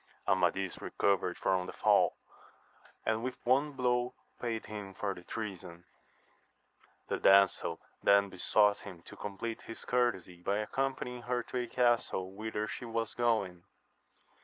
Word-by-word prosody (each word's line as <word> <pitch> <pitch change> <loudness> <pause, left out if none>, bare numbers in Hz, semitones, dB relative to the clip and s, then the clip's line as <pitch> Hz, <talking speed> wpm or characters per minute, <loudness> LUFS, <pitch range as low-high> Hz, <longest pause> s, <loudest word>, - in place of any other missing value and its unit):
Amadis 95 0 +1
recovered 90 -3 +1
from 95 -1 +1
the - - -7
fall, - - +3 0.9
and 110 +1 +1
with 130 0 -2
one 140 +4 +3
blow 125 -1 0 0.3
paid 115 -2 -2
him 100 -3 -7
for 100 -2 -2
the 90 - -11
treason. 90 -4 -6 1.2
The - - -1
damsel 100 -1 +4 0.2
then 100 0 +5
besought 105 +3 +3
him 90 -4 -10
to - - -11
compleat 105 +3 -5
his 115 - -9
courtesy 95 -8 0
by 100 +3 0
accompanying 125 +2 -2
her 120 0 -1
to 125 - -5
a 120 - -2
castle 120 -6 +1
whither 110 +1 -3
she - - -6
was 115 -2 -2
going. 110 -7 0
105 Hz, 135 wpm, -32 LUFS, 95-120 Hz, 1.2 s, then